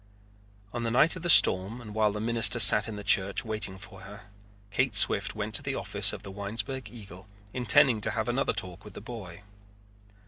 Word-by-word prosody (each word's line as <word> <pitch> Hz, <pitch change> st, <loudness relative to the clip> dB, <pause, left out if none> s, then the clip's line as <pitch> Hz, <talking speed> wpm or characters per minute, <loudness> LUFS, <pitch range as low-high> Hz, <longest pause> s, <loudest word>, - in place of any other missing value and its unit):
On 120 Hz, -, -6 dB
the 115 Hz, -, -4 dB
night 135 Hz, +9 st, +2 dB
of 180 Hz, -, -10 dB
the 175 Hz, -, -5 dB
storm 100 Hz, -, +4 dB
and 110 Hz, -3 st, -13 dB
while 110 Hz, -1 st, -1 dB
the 105 Hz, -, -8 dB
minister 115 Hz, 0 st, 0 dB
sat 105 Hz, +1 st, +8 dB
in 110 Hz, -, -8 dB
the 105 Hz, -, -10 dB
church 100 Hz, +1 st, 0 dB
waiting 110 Hz, -4 st, -5 dB
for 90 Hz, -, -14 dB
her, 105 Hz, 0 st, -15 dB, 0.4 s
Kate 125 Hz, +1 st, -2 dB
Swift 100 Hz, -, +3 dB
went 105 Hz, 0 st, -7 dB
to -, -, +3 dB
the 140 Hz, -1 st, -6 dB
office 100 Hz, +1 st, -3 dB
of -, -, -11 dB
the 100 Hz, -, -11 dB
Winesburg 105 Hz, +5 st, -7 dB
Eagle, 100 Hz, -4 st, -15 dB, 0.3 s
intending 125 Hz, -1 st, +1 dB
to -, -, -2 dB
have -, -, -5 dB
another -, -, -3 dB
talk 90 Hz, +1 st, -5 dB
with 105 Hz, -, -15 dB
the -, -, -9 dB
boy. 100 Hz, -5 st, -12 dB
105 Hz, 205 wpm, -25 LUFS, 100-120 Hz, 0.4 s, sat